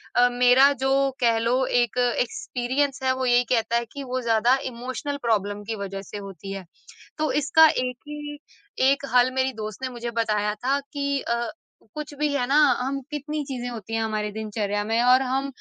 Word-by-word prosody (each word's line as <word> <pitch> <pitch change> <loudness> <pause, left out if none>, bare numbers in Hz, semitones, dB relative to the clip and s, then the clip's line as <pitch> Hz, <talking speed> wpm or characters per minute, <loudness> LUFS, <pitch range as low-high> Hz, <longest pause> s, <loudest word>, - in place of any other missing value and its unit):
अ, 245 0 +5
मेरा 250 +3 +6
जो 270 0 +2
कह 230 -2 +3
लो 245 +3 +1
एक 245 -1 +1 0.2
एक्सपीरियंस 275 - -1
है 260 0 +3
वो 260 0 -2
यही 245 0 +4
कहता 230 -1 +1
है 235 - -1
कि 280 - -6
वो 255 0 -3
ज़्यादा 235 +2 +3 0.2
इमोशनल 260 +5 -4
प्रॉब्लम 205 -2 0
की - - -1
वजह 195 -1 -5
से - - -5
होती 195 -1 -8
है। 195 -2 -7 0.5
तो 310 0 0
इसका 320 +2 +6
एक 250 -2 -2
ही 295 0 -6 0.5
एक 280 0 -1
हल 250 +1 +5
मेरी 260 0 +1
दोस्त 215 0 -7
ने 260 - -1
मुझे 240 -1 -5
बताया 210 -2 0
था 260 +6 0
कि 280 -1 -1
अ, 235 0 -1 0.5
कुछ 300 -1 -6
भी 300 - +2
है 270 -3 +1
ना 275 - +1 0.2
हम 270 +2 -2
कितनी 300 +1 -3
चीज़ें 250 -2 -4
होती 225 -2 -8
हैं 225 - 0
हमारे 215 -1 -2
दिनचर्या 205 -1 -2
में 225 +2 +1
और 250 +1 +6
हम 265 +1 -1
245 Hz, 190 wpm, -24 LUFS, 225-275 Hz, 0.5 s, मेरा